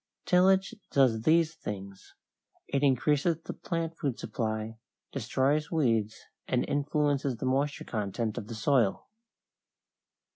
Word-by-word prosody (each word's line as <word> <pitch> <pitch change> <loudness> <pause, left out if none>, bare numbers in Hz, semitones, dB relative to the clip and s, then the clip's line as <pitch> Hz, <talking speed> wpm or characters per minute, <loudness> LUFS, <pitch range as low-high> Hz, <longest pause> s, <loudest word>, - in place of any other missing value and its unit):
Tillage 190 +3 +4 0.2
does 125 -5 +3
these 160 0 +4
things: 100 -9 -8 0.5
it 140 - 0
increases 145 +4 +2
the - - -5
plant 165 -1 -3
food 135 -4 -1
supply, 110 -1 -3 0.3
destroys 140 +6 0
weeds, 115 -9 +1 0.3
and 125 -1 0
influences 145 -2 0
the 130 - -4
moisture 140 +3 0
content 110 0 -2
of 105 - -9
the 115 - -6
soil. 115 -3 +1
135 Hz, 115 wpm, -29 LUFS, 110-150 Hz, 0.5 s, Tillage